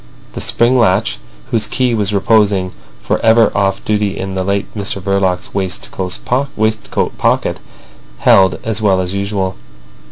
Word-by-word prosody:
The - - -5
spring 125 +2 +2
latch, 95 - +2 0.3
whose 110 -2 +1
key 125 -2 0
was 105 -3 0
reposing 100 -2 +2 0.3
for - - 0
ever 115 0 +4
off 100 -1 0
duty 105 -2 0
in 95 0 -4
the 95 0 -1
late 100 +1 0
Mr 100 -1 -3
Verloc's 95 -2 -1
waistcoat 110 +4 -2
pocket, - - +1 0.6
held 95 -2 +4
as 110 -1 -2
well 95 -3 +3
as 90 0 -2
usual. 100 -1 -2
100 Hz, 135 wpm, -15 LUFS, 95-110 Hz, 0.6 s, ever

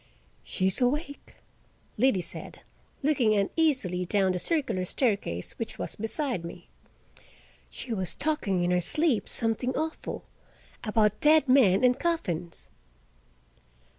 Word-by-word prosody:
"She's 190 +5 0
awake," 285 +3 -2 0.6
Liddy 225 -5 +2
said, - - -6 0.4
looking 255 -7 +2
uneasily 200 - +1
down 190 +1 +1
the 180 - -2
circular 260 - -1
staircase, 190 - -1
which 230 - -5
was - - -4
beside 225 - -2
me. 170 - -9 1.0
"She 240 - -4
was 190 -5 0
talkin' 215 - 0
in 175 - +1
her 180 0 +2
sleep 300 - +2
something 235 +2 -1
awful—about 220 -8 -3
dead 305 -1 +5
men 245 -7 +5
and 250 0 +4
coffins." 175 - -3
225 Hz, 110 wpm, -27 LUFS, 185-285 Hz, 1.0 s, dead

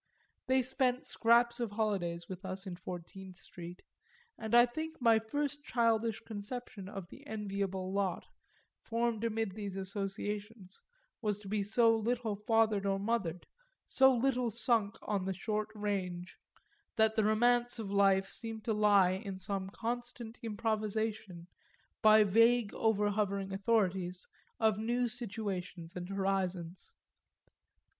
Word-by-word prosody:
They 260 0 +3
spent 255 0 +1
scraps 235 +1 +3
of 235 -2 -1
holidays 190 -6 -1
with 185 +1 -8
us 190 +1 -5
in 185 -2 -5
Fourteenth 180 +1 -8
Street, 175 -2 -10 0.5
and 220 +1 -1
I 240 0 +9
think 315 +6 -6
my 230 -3 +5
first 290 +5 -3
childish 230 -3 +1
conception 210 -2 -6
of 195 -3 -7
the - - -13
enviable 195 -3 -3
lot, 195 -3 -1 0.6
formed 230 -1 -1
amid 225 -2 -1
these 200 -1 -6
associations, 200 +1 -5 0.4
was 210 -3 0
to 205 -1 -12
be 210 +1 0
so 225 +3 +4
little 225 -1 -1
fathered 215 -1 +2
or 195 0 +1
mothered, 195 -5 -2 0.4
so 265 0 +5
little 250 -1 +1
sunk 225 -2 +1
in 200 -3 0
the 190 - -1
short 210 +2 -2
range, 185 -4 -3 0.6
that 220 0 +3
the 220 - +3
romance 240 +3 +3
of 215 -4 -5
life 195 -1 +4
seemed 225 +1 -6
to 225 - +1
lie 205 -3 +5
in 190 0 -4
some 190 0 -4
constant 240 +1 -5
improvisation, 215 -4 -2 0.6
by 215 0 +7
vague 230 +2 +4
overhovering 205 -2 0
authorities, 190 -3 0 0.3
of 220 -2 +3
new 240 +2 0
situations 200 -7 -4
and 180 0 -5
horizons. 190 -3 -2
210 Hz, 130 wpm, -33 LUFS, 195-230 Hz, 0.6 s, I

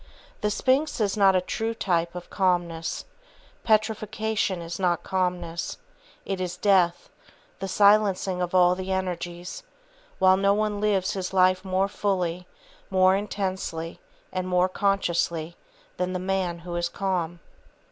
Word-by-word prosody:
The 210 - +1
Sphinx 265 +8 +1
is 205 -2 +1
not 195 -2 +5
a 185 - +3
true 225 +5 -3
type 170 -4 0
of 175 0 -8
calmness, 175 -4 0 0.6
petrifaction 215 -2 0
is 170 +2 -6
not 175 -3 +1
calmness; 180 -2 -2 0.5
it 195 -2 -3
is 180 -1 -3
death, 185 -4 +2 0.5
the 195 - -3
silencing 200 -2 +3
of 180 +1 -2
all 180 -1 +6
the 185 +1 -4
energies; 180 - -4 0.6
while 185 0 +5
no 200 +1 +3
one 210 -1 -1
lives 200 -2 +1
his 190 -1 -4
life 185 0 +4
more 190 0 +1
fully, 180 -3 -2 0.4
more 185 0 +4
intensely 190 -5 -3 0.3
and 185 0 -2
more 180 0 +3
consciously 170 -4 0 0.4
than 180 +1 -1
the - - -1
man 185 -2 -1
who 175 -1 -5
is 175 0 -1
calm. 175 -3 -2
185 Hz, 135 wpm, -26 LUFS, 175-200 Hz, 0.6 s, all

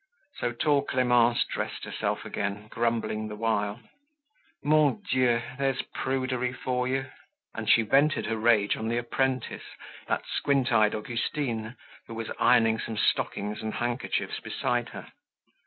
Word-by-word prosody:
So 120 - -1
tall 140 +4 +2
Clemence 125 -2 +3
dressed - - -4
herself - - -2
again, 100 +2 -3
grumbling 115 -2 -1
the 105 - -6
while. 105 -1 -1 0.8
"Mon 145 -7 +3
Dieu! 125 -2 +2 0.2
There's 135 -1 0
prudery 130 -1 -1
for 125 -1 -1
you." 135 +1 0 0.5
And - - -4
she 115 - +6
vented 140 +8 +3
her 115 +1 -1
rage 110 -2 +3
on 110 - -4
the 115 +1 0
apprentice, 130 +1 -2 0.3
that - - -1
squint 140 -2 +1
eyed 110 -2 +4
Augustine 115 +1 -3 0.3
who 115 - -7
was 115 0 -5
ironing 115 -2 +4
some 110 -1 -4
stockings 105 0 0
and 110 0 -4
handkerchiefs 120 +1 -2
beside 120 -1 -1
her. - - -10
120 Hz, 140 wpm, -28 LUFS, 110-130 Hz, 0.8 s, she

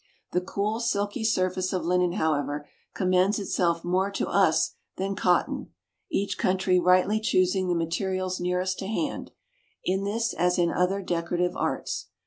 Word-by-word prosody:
The 180 - +1
cool 205 +4 -2
silky 220 -1 -1
surface 185 -3 +1
of 180 -3 -1
linen, 180 0 +2
however, 150 -4 -1 0.3
commends 185 +2 +2
itself 170 -4 0
more 185 +3 +1
to - - -1
us - - +3 0.2
than 195 +1 -2
cotton, 180 -2 0 0.4
each 200 +1 -1
country 185 0 +2
rightly 185 +4 +4
choosing 185 -3 +2
the 175 - +1
materials 185 +2 -1
nearest 180 +1 -1
to 190 - -4
hand, 280 +8 -2 0.5
in 190 +2 0
this 225 +3 -1
as 180 +1 +1
in 170 -1 +2
other 190 +2 0
decorative 175 0 -1
arts. - - -2
185 Hz, 145 wpm, -26 LUFS, 180-195 Hz, 0.5 s, rightly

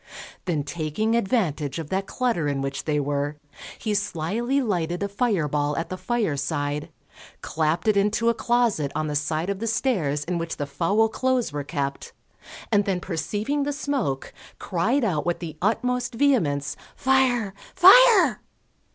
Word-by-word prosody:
Then 160 -5 -1
taking 160 +8 -2
advantage 175 - 0
of 160 -3 -6
that 195 +1 -1
clutter 235 -12 0
in 140 -1 -1
which 135 0 -4
they 150 -2 +1
were, 145 +1 -1 0.4
he 215 - -2
slily 205 - -1
lighted 180 -7 -1
a - - 0
fire 200 -6 0
ball 145 0 -1
at 165 - -3
the 185 - -3
fire 220 -5 -1
side, 145 0 -2 0.5
clapped 160 +5 -1
it 215 - +4
into 210 +3 +1
a 235 - +5
closet 230 - +1
on 155 0 -1
the 150 -1 -3
side 155 +5 -1
of 195 - -4
the 230 - -3
stairs 190 - 0
in 170 +2 -2
which 165 0 -4
the 145 - -2
foul 170 +10 +1
clothes 255 - 0
were 145 -1 -3
kept, 140 -2 -4 0.6
and 205 -2 +3
then 190 -2 0
perceiving 210 - -2
the 285 +1 -1
smoke, 275 - -2 0.2
cried 220 +10 0
out 170 -9 0
with 175 0 -1
the 160 -3 -7
utmost 250 +4 0
vehemence, 155 - +1 0.2
_Fire, 255 -6 +2 0.2
fire. 425 +3 +7
185 Hz, 160 wpm, -24 LUFS, 150-235 Hz, 0.6 s, fire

